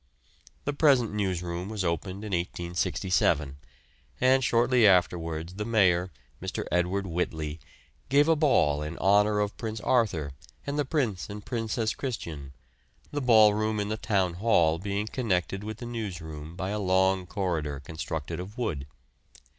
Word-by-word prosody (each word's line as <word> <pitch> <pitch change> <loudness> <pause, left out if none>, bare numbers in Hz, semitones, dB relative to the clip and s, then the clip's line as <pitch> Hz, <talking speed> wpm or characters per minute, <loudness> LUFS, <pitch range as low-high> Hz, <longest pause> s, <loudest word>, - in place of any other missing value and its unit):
The 145 - -1
present 135 -7 +3
newsroom 90 -2 -2
was 110 -3 -3
opened 95 +3 -2
in 105 - -6
1867, 85 -4 0 0.6
and 130 +1 +4
shortly 120 -1 +4
afterwards 85 -3 +1
the 105 +3 -4
Mayor, 95 -5 +2 0.3
Mr. - - -4
Edward 90 +3 +1
Whitley, 80 -3 -3 0.5
gave 145 +2 +5
a 165 - +5
ball 80 - +3
in 75 +2 -5
honour 105 +2 +3
of 105 0 -1
Prince 110 -1 -4
Arthur 95 - +1 0.3
and 140 +1 -2
the 145 - +1
Prince 125 - -1
and 105 0 -8
Princess 115 -1 -1
Christian, 80 - -5 0.6
the 145 - -2
ballroom 110 -3 +4
in 105 0 -2
the 110 - -1
Town 95 -5 0
Hall 85 -5 +2
being 100 +2 -2
connected 100 -5 -1
with 110 0 -5
the 120 - -7
newsroom 85 -9 -6
by 95 +1 -3
a 105 - -2
long 95 -1 +2
corridor 80 -8 -2
constructed 80 +2 -5
of 100 +6 -8
wood. 80 - -2
95 Hz, 145 wpm, -28 LUFS, 85-110 Hz, 0.6 s, gave